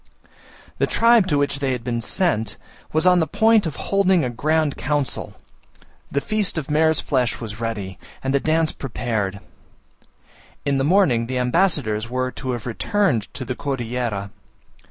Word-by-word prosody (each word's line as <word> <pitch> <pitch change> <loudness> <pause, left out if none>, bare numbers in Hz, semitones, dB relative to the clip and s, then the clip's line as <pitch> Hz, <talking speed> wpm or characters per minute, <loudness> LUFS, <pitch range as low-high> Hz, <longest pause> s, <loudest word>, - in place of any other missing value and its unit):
The - - +2
tribe 230 -4 +4
to 150 -5 +1
which 140 -1 0
they 135 -2 0
had 125 -2 -4
been 120 -1 -2
sent 115 - 0 0.3
was 155 +3 +2
on 180 -1 +6
the 160 - +1
point 220 +2 +3
of 150 - -5
holding 190 -5 +2
a 125 - -2
grand 155 +4 0
council, 145 -1 -2 0.8
the 140 - +1
feast 210 +2 0
of 150 -2 -3
mare's 160 0 +3
flesh 125 -4 0
was 110 -1 -7
ready, 105 -5 -4 0.2
and 135 0 -1
the 140 - +3
dance 160 +2 +1
prepared: 110 -6 -3 1.3
in 140 -1 +1
the - - +1
morning 145 -9 +3
the 130 +1 -2
ambassadors 125 - +1
were 130 +1 -1
to 130 - -6
have 120 -3 -5
returned 125 - 0
to 130 - -5
the 130 - -2
Cordillera. 120 -6 -3
135 Hz, 160 wpm, -22 LUFS, 120-160 Hz, 1.3 s, on